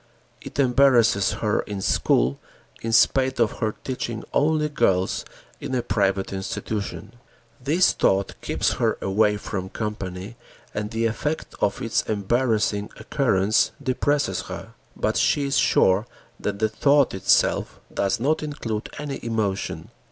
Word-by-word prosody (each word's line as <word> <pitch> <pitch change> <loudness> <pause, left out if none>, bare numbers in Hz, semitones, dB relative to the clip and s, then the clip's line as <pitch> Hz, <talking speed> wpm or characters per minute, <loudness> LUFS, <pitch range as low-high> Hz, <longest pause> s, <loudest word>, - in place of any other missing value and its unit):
It - - -9
embarrasses 125 -6 +4
her 105 - +2
in 100 -1 -4
school, 65 -7 +2 0.4
in 115 - -3
spite 130 +3 +3
of 115 -3 +1
her 110 -1 -1
teaching 120 -4 -4
only 150 +1 +2
girls 95 -10 +1 0.3
in 130 - -4
a 125 - 0
private 100 -2 0
institution. 100 +2 -4 0.5
This 160 +7 +4
thought 95 0 +1
keeps - - 0
her - - +2
away 105 +2 +2
from 95 -2 -5
company 100 0 -5 0.4
and 105 0 -3
the 115 +1 -1
effect 150 +7 -2
of - - 0
its - - +1
embarrassing 110 -1 0
occurrence 110 -6 +1
depresses 140 +1 0
her, - - -7 0.2
but - - 0
she 145 - +2
is 140 - 0
sure 95 +5 +3 0.3
that 100 -1 -2
the 110 +1 +2
thought 140 +5 +3
itself 95 - +2
does 100 +4 0
not 145 +6 +1
include 120 -8 -4
any 145 -2 -5
emotion. 110 -4 -2
110 Hz, 135 wpm, -24 LUFS, 100-130 Hz, 0.5 s, embarrasses